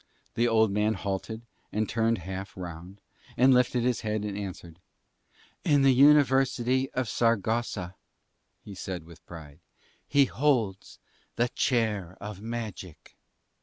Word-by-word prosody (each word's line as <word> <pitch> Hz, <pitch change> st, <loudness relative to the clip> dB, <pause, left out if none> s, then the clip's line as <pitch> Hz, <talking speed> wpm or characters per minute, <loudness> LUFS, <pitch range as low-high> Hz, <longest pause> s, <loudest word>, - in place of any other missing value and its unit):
The 120 Hz, +1 st, +2 dB
old 110 Hz, -2 st, +3 dB
man 105 Hz, +2 st, +1 dB
halted 100 Hz, +4 st, -4 dB, 0.3 s
and 110 Hz, 0 st, -1 dB
turned 115 Hz, 0 st, +1 dB
half 95 Hz, +1 st, -6 dB
round, 90 Hz, +2 st, -9 dB, 0.4 s
and 130 Hz, +2 st, +6 dB
lifted 125 Hz, -1 st, +2 dB
his 125 Hz, -1 st, 0 dB
head 105 Hz, -1 st, -2 dB
and 100 Hz, -2 st, -4 dB
answered. 90 Hz, -4 st, -7 dB, 0.8 s
"In 145 Hz, -2 st, +3 dB
the 135 Hz, -1 st, +6 dB
University 130 Hz, -2 st, +4 dB
of 130 Hz, -2 st, -1 dB
Saragossa," 115 Hz, -4 st, 0 dB, 0.7 s
he 105 Hz, -, -10 dB
said 95 Hz, -2 st, -6 dB
with 85 Hz, 0 st, -16 dB
pride, 75 Hz, -3 st, -11 dB, 0.5 s
"he 140 Hz, -1 st, +4 dB
holds 125 Hz, -9 st, -1 dB, 0.4 s
the 120 Hz, +1 st, +1 dB
Chair 105 Hz, -9 st, -1 dB
of 100 Hz, -1 st, -8 dB
Magic." 110 Hz, -7 st, -7 dB
110 Hz, 130 wpm, -28 LUFS, 95-125 Hz, 0.8 s, and